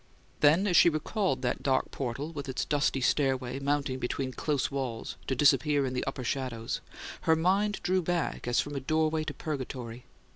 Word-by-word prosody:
Then, 155 Hz, +7 st, +5 dB
as 185 Hz, -4 st, +1 dB
she 170 Hz, -, +8 dB
recalled 155 Hz, -, -1 dB
that 125 Hz, -, -1 dB
dark 130 Hz, -1 st, +1 dB
portal, 135 Hz, +4 st, -4 dB
with 140 Hz, -3 st, -6 dB
its 130 Hz, -, -2 dB
dusty 145 Hz, -2 st, +1 dB
stairway 130 Hz, -1 st, +1 dB
mounting 140 Hz, -2 st, -1 dB
between 130 Hz, +1 st, -2 dB
close 140 Hz, +1 st, -1 dB
walls 130 Hz, -5 st, -4 dB
to 130 Hz, -, 0 dB
disappear 140 Hz, +1 st, +4 dB
in 130 Hz, -, -3 dB
the 125 Hz, -, -1 dB
upper 135 Hz, -1 st, -3 dB
shadows, 120 Hz, -3 st, -3 dB, 0.5 s
her 160 Hz, -, +7 dB
mind 195 Hz, +5 st, +1 dB
drew 185 Hz, +1 st, +2 dB
back 175 Hz, -6 st, -2 dB
as 120 Hz, -, +2 dB
from 145 Hz, 0 st, -2 dB
a -, -, -1 dB
doorway 155 Hz, +3 st, +1 dB
to 150 Hz, -, -4 dB
Purgatory. 125 Hz, -5 st, -5 dB
140 Hz, 180 wpm, -29 LUFS, 130-155 Hz, 0.5 s, she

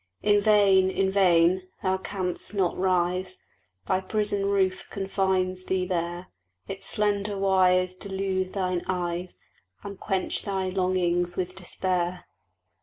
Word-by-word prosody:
In 205 Hz, 0 st, +4 dB
vain 200 Hz, -3 st, +4 dB
in 190 Hz, 0 st, 0 dB
vain! 185 Hz, -1 st, +3 dB, 0.2 s
Thou 190 Hz, 0 st, +1 dB
canst 190 Hz, +1 st, -3 dB
not 185 Hz, -3 st, +1 dB
rise: 185 Hz, 0 st, 0 dB, 0.5 s
Thy 185 Hz, -, +1 dB
prison 205 Hz, 0 st, 0 dB
roof 190 Hz, -1 st, 0 dB
confines 190 Hz, -2 st, -1 dB
thee 185 Hz, -1 st, 0 dB
there; 175 Hz, 0 st, -3 dB, 0.4 s
Its 195 Hz, 0 st, -3 dB
slender 205 Hz, -1 st, 0 dB
wires 185 Hz, -1 st, +3 dB
delude 190 Hz, -1 st, -3 dB
thine 185 Hz, -3 st, -1 dB
eyes, 180 Hz, -1 st, -3 dB, 0.5 s
And 200 Hz, -1 st, -8 dB
quench 190 Hz, -2 st, -1 dB
thy 190 Hz, -2 st, -2 dB
longings 180 Hz, -2 st, 0 dB
with 185 Hz, 0 st, -2 dB
despair. 180 Hz, -1 st, -2 dB
185 Hz, 120 wpm, -26 LUFS, 180-195 Hz, 0.5 s, In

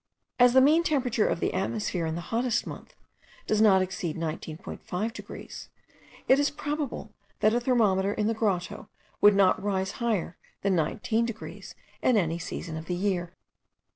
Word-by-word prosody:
As 245 Hz, 0 st, +6 dB
the 260 Hz, -, +7 dB
mean 305 Hz, +5 st, +5 dB
temperature 255 Hz, -9 st, +1 dB
of -, -, -1 dB
the -, -, -1 dB
atmosphere, 190 Hz, -3 st, -1 dB
in 160 Hz, -, -2 dB
the 170 Hz, -, -4 dB
hottest 235 Hz, 0 st, +1 dB
month, -, -, -9 dB, 0.5 s
does 215 Hz, 0 st, +1 dB
not 195 Hz, -4 st, +6 dB
exceed 185 Hz, -3 st, -4 dB
19.5 165 Hz, +6 st, -4 dB
degrees,* -, -, -9 dB, 0.6 s
it 265 Hz, -, +5 dB
is 285 Hz, -, +3 dB
probable 290 Hz, -7 st, -4 dB, 0.3 s
that 215 Hz, +1 st, +4 dB
a 240 Hz, -, +3 dB
thermometer 210 Hz, -6 st, +2 dB
in 210 Hz, 0 st, -1 dB
the 225 Hz, -, +2 dB
grotto 200 Hz, -5 st, -2 dB, 0.3 s
would 205 Hz, 0 st, +7 dB
not 195 Hz, -2 st, +4 dB
rise 190 Hz, -1 st, -1 dB
higher 215 Hz, -7 st, -1 dB, 0.3 s
than 195 Hz, -1 st, +2 dB
19 215 Hz, +8 st, 0 dB
degrees 225 Hz, -1 st, -8 dB, 0.3 s
at 255 Hz, -, +3 dB
any 170 Hz, -5 st, +1 dB
season 165 Hz, -1 st, -5 dB
of 160 Hz, -, -7 dB
the 180 Hz, -, -2 dB
year. 180 Hz, -2 st, -1 dB
205 Hz, 165 wpm, -27 LUFS, 180-235 Hz, 0.6 s, the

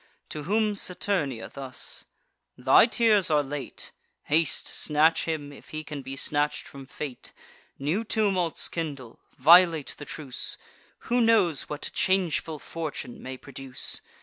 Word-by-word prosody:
To 150 Hz, -2 st, -6 dB
whom 215 Hz, +3 st, +2 dB
Saturnia 180 Hz, -, -1 dB
thus: 135 Hz, -2 st, -4 dB, 0.5 s
"Thy -, -, +6 dB
tears 220 Hz, -6 st, +4 dB
are 150 Hz, -2 st, +3 dB
late: 140 Hz, 0 st, -6 dB, 0.3 s
Haste, 160 Hz, +2 st, +2 dB
snatch 155 Hz, +2 st, +2 dB
him, 150 Hz, -3 st, -3 dB
if -, -, -15 dB
he 155 Hz, 0 st, -5 dB
can 150 Hz, -2 st, -6 dB
be 135 Hz, 0 st, -7 dB
snatch'd 145 Hz, +2 st, -1 dB
from 135 Hz, -1 st, -11 dB
fate: 135 Hz, -2 st, -7 dB, 0.4 s
New 155 Hz, +11 st, -1 dB
tumults 195 Hz, -7 st, +1 dB
kindle; 140 Hz, -8 st, -5 dB, 0.2 s
violate 165 Hz, +1 st, +6 dB
the 145 Hz, -, -7 dB
truce: 145 Hz, -3 st, -4 dB, 0.4 s
Who 245 Hz, +1 st, +1 dB
knows 220 Hz, -, +3 dB
what 150 Hz, -, -4 dB
changeful 175 Hz, -4 st, +1 dB
fortune 150 Hz, -5 st, -6 dB
may 130 Hz, 0 st, -6 dB
produce? 135 Hz, -1 st, -4 dB
155 Hz, 130 wpm, -27 LUFS, 140-180 Hz, 0.5 s, Thy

